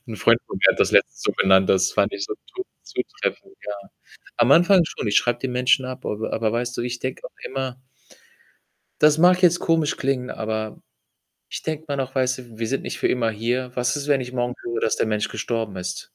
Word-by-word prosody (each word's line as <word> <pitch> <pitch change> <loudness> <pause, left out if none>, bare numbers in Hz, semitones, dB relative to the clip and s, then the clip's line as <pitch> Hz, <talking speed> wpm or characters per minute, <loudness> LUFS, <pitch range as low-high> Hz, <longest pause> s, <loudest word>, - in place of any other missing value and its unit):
'N 115 - -7
Freund - - +4
von - - -6
mir - - +6
hat - - -6
das - - +4
letztens - - +3
so - - +1
genannt, 95 0 +4
das 95 -1 +3
fand - - +1
ich 370 -3 -3
so 415 - -4
zu 375 - -6 0.2
zutreffend, 390 - -4
ja. - - -4 0.7
Am 120 +4 +4
Anfang 175 +3 +6
schon, 110 - -5
ich 105 - 0
schreibe 120 0 +2
die 135 - -2
Menschen 125 +1 +2
ab, 130 0 -7
aber 110 +1 -3
aber 110 -1 0
weißt 120 +1 -2
du, - - -1
ich 120 0 -4
denke 130 0 -4
auch - - -12
immer 130 -1 -4 1.2
Das 150 +1 +5
mag 180 +2 +5
jetzt 175 -1 +5
komisch 165 -3 +1
klingen, 130 -2 -1
aber 110 -1 -4 0.7
ich - - -6
denke 160 0 -4
immer 140 - -2
noch, 135 -1 -3
weißt 130 -1 +1
du, 120 -3 -13
wir 115 - -1
sind 135 +3 -2
nicht - - -5
für - - +2
immer 115 -3 +1
hier. 120 +4 -2
Was 125 +2 0
ist, 145 0 -4
wenn 140 -3 +3
ich 125 0 -7
morgen 120 -1 -1
höre, 115 -1 -3
dass 110 - +1
der - - +1
Mensch 105 -1 -1
gestorben 115 -4 -3
ist? 90 0 -4
125 Hz, 225 wpm, -23 LUFS, 115-140 Hz, 1.2 s, mir